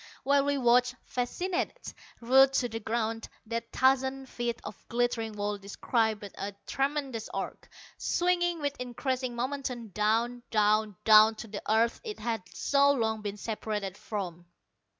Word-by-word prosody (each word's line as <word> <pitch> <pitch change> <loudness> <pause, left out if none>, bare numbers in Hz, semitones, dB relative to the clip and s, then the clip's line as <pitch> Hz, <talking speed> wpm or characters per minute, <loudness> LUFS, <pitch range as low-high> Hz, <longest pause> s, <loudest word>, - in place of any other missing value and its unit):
While 280 0 +3
we 285 0 +1
watched, 250 0 +4
fascinated, 360 - -3 0.3
rooted 265 +3 +6
to 245 -2 +1
the 225 0 -4
ground, 225 0 -2 0.2
that 230 +1 -4
thousand 265 +1 +2
feet 240 -1 -3
of - - -7
glittering 235 -2 0
wall 205 0 -2
described 215 +2 0 0.2
a 200 +1 -4
tremendous 275 -4 -2
arc, - - -5 0.3
swinging 350 -1 +1
with 285 -1 -1
increasing 250 0 -2
momentum 250 -2 -3
down, 225 +5 +1
down, 215 -1 +2
down 215 0 +7
to 220 - -8
the 205 -1 -6
earth 230 +2 +2
it 430 -3 -5
had 230 -3 -2
so 280 +10 +3
long 220 -5 0
been 205 -1 -4
separated 210 -3 -3
from. 180 -5 -5
235 Hz, 140 wpm, -29 LUFS, 215-265 Hz, 0.3 s, down